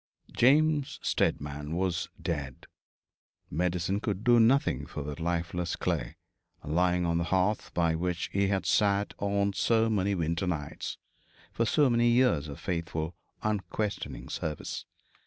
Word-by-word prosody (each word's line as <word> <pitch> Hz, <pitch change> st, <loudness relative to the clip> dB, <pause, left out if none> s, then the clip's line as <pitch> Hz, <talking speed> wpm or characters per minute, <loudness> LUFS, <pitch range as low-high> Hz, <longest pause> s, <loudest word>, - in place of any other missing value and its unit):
James 145 Hz, +2 st, +3 dB
Steadman 75 Hz, +2 st, -1 dB
was 90 Hz, -1 st, -1 dB
dead. 70 Hz, -6 st, -4 dB, 0.9 s
Medicine 90 Hz, +4 st, 0 dB
could 105 Hz, -1 st, -3 dB
do 120 Hz, 0 st, +6 dB
nothing 115 Hz, -, +3 dB
for 75 Hz, -, -5 dB
that 75 Hz, +2 st, -6 dB
lifeless 85 Hz, 0 st, -1 dB
clay, -, -, -2 dB, 0.5 s
lying 90 Hz, +4 st, +1 dB
on 85 Hz, 0 st, +1 dB
the 85 Hz, -, 0 dB
hearth 95 Hz, +4 st, +1 dB
by 85 Hz, -2 st, +2 dB
which 85 Hz, +1 st, -1 dB
he 100 Hz, 0 st, +2 dB
had 95 Hz, -2 st, 0 dB
sat 100 Hz, +4 st, +2 dB
on 100 Hz, 0 st, +1 dB
so 115 Hz, +4 st, +2 dB
many 100 Hz, -1 st, +1 dB
winter 85 Hz, +2 st, -1 dB
nights, 75 Hz, -5 st, -4 dB, 0.5 s
for 115 Hz, -, 0 dB
so 145 Hz, +6 st, +4 dB
many 120 Hz, -1 st, +3 dB
years 120 Hz, -, +3 dB
of 70 Hz, -, -8 dB
faithful 85 Hz, -2 st, -3 dB, 0.3 s
unquestioning 100 Hz, -, -2 dB
service. 75 Hz, -2 st, -4 dB
90 Hz, 135 wpm, -29 LUFS, 80-105 Hz, 0.9 s, do